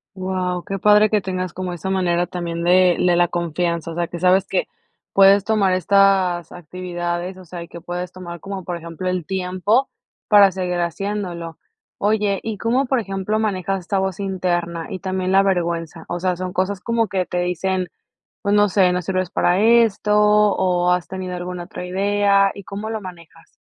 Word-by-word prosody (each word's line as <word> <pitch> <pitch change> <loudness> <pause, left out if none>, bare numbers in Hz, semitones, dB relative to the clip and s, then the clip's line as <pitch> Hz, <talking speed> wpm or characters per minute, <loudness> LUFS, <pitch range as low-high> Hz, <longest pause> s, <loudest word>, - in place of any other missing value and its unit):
Guau, 185 -1 -2
qué 195 0 -4
padre 210 +2 +5
que 210 -1 +2
tengas 185 -2 -4
como 185 -1 -4
esa 175 +2 -5
manera 175 -2 +1
también 170 -2 -4
de 180 0 +4
de 180 -1 +3
la 175 0 +3
confianza, 170 0 -2
o - - -7
sea, 170 0 -1
que 175 - -7
sabes 185 +2 +3
que - - -1 0.5
puedes 195 0 +6
tomar 205 -3 +2
estas 185 -2 +2
actividades, 175 +1 -5
o 185 - -13
sea, 175 0 -8
y - - -12
que 170 - -11
puedes 180 +1 -5
tomar 175 -2 -9
como, 195 +2 -6
por 175 0 -4
ejemplo, 170 +2 -6
el 180 -3 -2
tiempo 190 - 0 0.4
para 205 -2 +7
seguir 180 -1 -2
haciéndolo, 175 -2 -4 0.4
oye, 205 -1 +1
¿y 220 -2 -4
cómo, 245 +6 +1
por 265 0 +1
ejemplo, 195 0 -2
manejas 195 -3 -1
esta 195 +2 -1
voz 190 -1 -2
interna 175 -4 -2
y 190 - -5
también 185 -1 -2
la 195 +1 +5
vergüenza?, 170 -3 -2
o 175 - -3
sea, 180 0 0
son 185 +1 -4
cosas 190 +1 -1
como 230 0 0
que 190 -3 -1
te 180 - -2
dicen, 180 +1 -1 0.6
pues, 200 0 +1
no 205 0 +4
sé: 185 -2 +3
"No 180 - 0
sirves 185 0 -2
para 180 +2 +2
esto" 225 -2 +3
¿o 205 -4 +3
has 180 -1 -1
tenido 185 -1 -5
alguna 180 0 -5
otra 180 0 -8
idea? 200 +1 +2
¿Y 200 - -10
cómo 205 +3 -6
lo 220 -1 -3
manejas? 170 -3 -13
185 Hz, 190 wpm, -21 LUFS, 175-195 Hz, 0.6 s, para